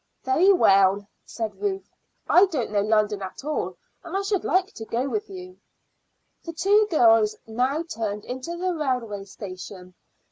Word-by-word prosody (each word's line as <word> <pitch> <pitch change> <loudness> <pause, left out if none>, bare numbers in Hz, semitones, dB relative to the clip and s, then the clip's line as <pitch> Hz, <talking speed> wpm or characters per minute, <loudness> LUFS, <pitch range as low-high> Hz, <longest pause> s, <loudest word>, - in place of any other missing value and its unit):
"Very 320 +9 +4
well," 195 - +4 0.2
said 225 - -5
Ruth. 395 -2 -2 0.4
"I 380 +3 +6
don't 285 - -3
know 205 -1 +2
London 210 -1 +1
at 190 +8 -8
all, 305 - -3 0.3
and 345 +2 -4
I 395 - -1
should 395 -2 -1
like 375 +3 +1
to 225 - -8
go 240 +4 -2
with 420 +8 -3
you." 370 -1 -10 0.8
The 335 - -7
two 405 +6 +3
girls 225 - +4
now 255 +8 -1
turned 215 -9 -4
into 260 +7 -5
the 365 +1 -1
railway 250 -10 -2
station. 185 -1 -9
260 Hz, 155 wpm, -24 LUFS, -, 0.8 s, I